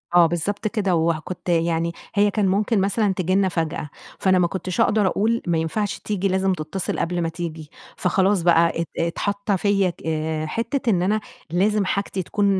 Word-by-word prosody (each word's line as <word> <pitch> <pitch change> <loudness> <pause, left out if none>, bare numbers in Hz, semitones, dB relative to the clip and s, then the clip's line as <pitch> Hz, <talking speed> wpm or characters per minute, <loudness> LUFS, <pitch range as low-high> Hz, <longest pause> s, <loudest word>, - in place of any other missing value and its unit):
آه، 175 -1 +8
بالضبط 185 +6 -2
كده، 200 -4 0
وه 165 -1 +1
كنت 180 +2 -7
يعني 170 0 +1 0.2
هي 205 0 +4
كان 205 -2 +1
ممكن 200 +2 +2
مثلًا 200 +1 +1
تيجي 185 0 0
لنا 195 -1 +3
فجأة، 160 -3 -3 0.3
فأنا 185 -1 +3
ما 175 - +3
كنتش 185 0 -2
أقدر 210 -2 +3
أقول 225 +5 +1
ما 170 - +2
ينفعش 195 +6 -2
تيجي 200 -2 -1
لازم 190 0 +1
تتصل 170 +2 -3
قبل 175 +1 -1
ما 165 - 0
تيجي، 165 -2 -6 0.3
فخلاص 190 +1 +2
بَقى 170 -1 +3
ات 170 - -3
اتحط 200 +5 -1
فيَّ 195 -1 +2
ك - - -19 0.4
حتة 235 - -2
إن 185 -5 +2
أنا 210 +4 +1 0.3
لازم 200 +4 +2
حاجتي 195 -1 -2
تكون 205 +4 -1
185 Hz, 180 wpm, -22 LUFS, 170-205 Hz, 0.4 s, آه